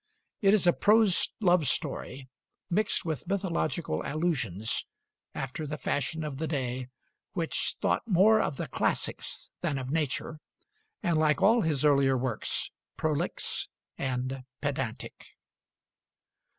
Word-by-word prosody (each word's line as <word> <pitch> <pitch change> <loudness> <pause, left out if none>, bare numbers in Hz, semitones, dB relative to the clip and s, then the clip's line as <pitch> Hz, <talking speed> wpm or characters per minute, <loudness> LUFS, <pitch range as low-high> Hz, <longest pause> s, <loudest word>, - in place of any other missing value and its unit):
It 200 0 +6
is 200 - +3
a 175 - +6
prose 210 -4 +4
love 175 -6 +4
story, 130 +2 -2 0.4
mixed 205 +1 +1
with 160 +1 -3
mythological 180 -4 -1
allusions, 125 - -1 0.5
after 135 +3 -4
the 150 +1 -4
fashion 150 +3 -1
of 150 -3 -4
the 160 - -1
day, 130 -4 -2 0.5
which 165 -3 -1
thought - - +2
more 215 +3 +5
of 140 - -2
the - - -3
classics - - -2
than 145 - 0
of 130 0 -4
nature; 155 0 -1 0.6
and 170 -4 +2
like 150 -2 +3
all 225 +3 +6
his 150 -5 +1
earlier 140 -2 +4
works, 125 -3 -2 0.3
prolix 155 -2 -1 0.3
and 130 0 -2 0.2
pedantic. 135 -6 -3
150 Hz, 125 wpm, -29 LUFS, 135-175 Hz, 0.6 s, It